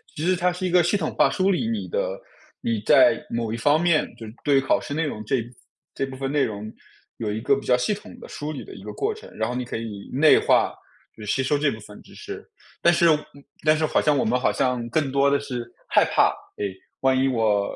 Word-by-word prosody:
其 150 - -4
实 185 0 +2
它 180 +1 +1
是 180 +1 -4
一 180 - -1
个 180 0 +6
系 175 - +1
统 175 -6 -1
化 - - +4
梳 190 +1 +1
理 195 +5 0
你 225 -2 -3
的 - - -2 0.4
你 115 -2 -1
在 - - +5
某 115 -2 -2
一 115 - -3
方 145 +7 +3
面 170 -3 +3
就 115 - -9
是 110 - -10
对 140 -2 +4
考 135 - +2
试 - - -6
内 160 +2 0
容 110 -7 -5
这 125 +1 0 0.5
这 - - -2
部 135 -1 -8
分 135 +1 -3
内 145 -1 +2
容 105 0 -4 0.5
有 110 -2 -3
一 110 - -4
个 140 +4 +3
比 - - -12
较 125 - +5
系 125 +12 0
统 210 +4 -12
的 - - -10
梳 150 +1 -5
理 140 - -7
的 - - -11
一 - - -11
个 - - -7
过 425 +2 -1
程。 435 - -13
然 110 +1 -1
后 125 - -3
你 125 0 -2
可 - - -6
以 105 -3 -7
内 150 +4 +6
化， - - +3 0.4
就 110 - -9
是 - - -6
吸 135 - +1
收 145 +2 +1
这 145 0 +2
部 110 - -7
分 105 0 -13
知 - - -17
识， - - -8 0.4
但 170 - +5
是 170 0 +3 0.6
但 155 0 +5
是 155 - +1
好 - - +1
像 150 -1 +2
我 - - +2
们 125 +3 +1
好 125 - +2
像 125 -3 0
更 140 +2 0
多 140 +1 +3
的 140 - +3
是 125 -4 -5 0.2
害 - - +5
怕， - - +4 0.3
哎， 105 - -2 0.4
万 130 0 +3
一 135 - +3
我 110 -5 +1
135 Hz, 280 characters per minute, -24 LUFS, 115-160 Hz, 0.6 s, 个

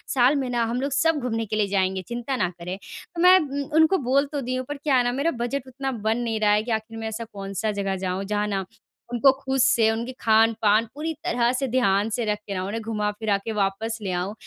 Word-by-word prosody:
साल 260 +3 +5
में 265 -3 -1
ना, 240 -1 +1
हम 235 +3 -1
लोग 280 0 -2
सब 315 +3 +2
घूमने 225 -3 -2
के 215 - -3
लिए 210 -2 +1
जाएँगे, 190 -1 0
चिंता 240 +3 -3
ना 185 -7 0
करें।" 180 +2 -5
तो 335 - -9
मैं 365 +1 +8
उम, 285 -3 -3 0.2
उनको 320 +4 +5
बोल 275 +2 +4
तो 285 -2 -2
दी 255 +1 -2
हूँ, 255 - -3
पर 290 - -4
क्या 285 -1 +1
है 250 - +4
ना, 245 - +1
मेरा 280 +6 0
बजट 265 +1 -3
उतना 270 +1 -4 0.2
बन 225 +2 +2
नहीं 230 -2 -2
रहा 210 -1 +3
है 210 +1 +3
कि 235 - -4
आखिर 220 0 -3
में 225 0 -4
ऐसा 220 +1 -4
कौन-सा 195 +2 -3
जगह 200 -1 -2
जाऊँ, 185 +2 -2
जहाँ 210 +1 -1
ना, 195 -2 -2 0.5
उनको 265 +3 +6
खुद 270 0 -2
से 235 -3 +4
उनके 235 +3 -3
खान-पान 220 0 +3
पूरी 315 +3 -3
तरह 245 -9 +1
से 260 +1 -1
ध्यान 215 -4 +2
से 235 - -1
रख 210 -1 0
के 200 - -3
ना, 185 -1 -2
उन्हें 220 +4 -3
घुमा 210 -2 -1
फिरा 210 -3 +1
के 225 - -2
वापस 205 +3 -1
ले 195 -3 -3
आऊँ 180 +3 -2
225 Hz, 255 wpm, -24 LUFS, 210-265 Hz, 0.5 s, मैं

